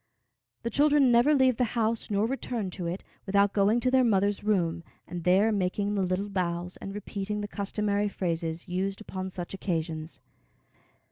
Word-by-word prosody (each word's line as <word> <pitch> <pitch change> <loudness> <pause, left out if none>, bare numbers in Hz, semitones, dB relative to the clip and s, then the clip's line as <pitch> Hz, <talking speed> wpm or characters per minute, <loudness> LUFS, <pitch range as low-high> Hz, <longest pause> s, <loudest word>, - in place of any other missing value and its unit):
The 235 - -2
children 285 0 +4
never 240 +6 +5
leave 260 -3 +4
the 250 - +2
house, 225 0 0
nor 205 0 +1
return 235 -5 -3
to 175 -1 -4
it, 175 +3 -4 0.2
without 200 0 +3
going 210 +3 +3
to 255 - +2
their 260 -1 +5
mother's 205 -3 +2
room, 175 -5 +1 0.2
and 175 -1 -6
there 195 +5 +4
making 200 +1 0
the 200 - 0
little 185 +2 -1
bows 180 -2 -2
and 195 - -7
repeating 205 0 -4
the 205 - -3
customary 205 0 -1
phrases 165 -3 -3
used 190 +2 -2
upon 190 -3 -5
such 180 -1 -6
occasions. 160 -4 -3
200 Hz, 165 wpm, -28 LUFS, 180-215 Hz, 0.2 s, never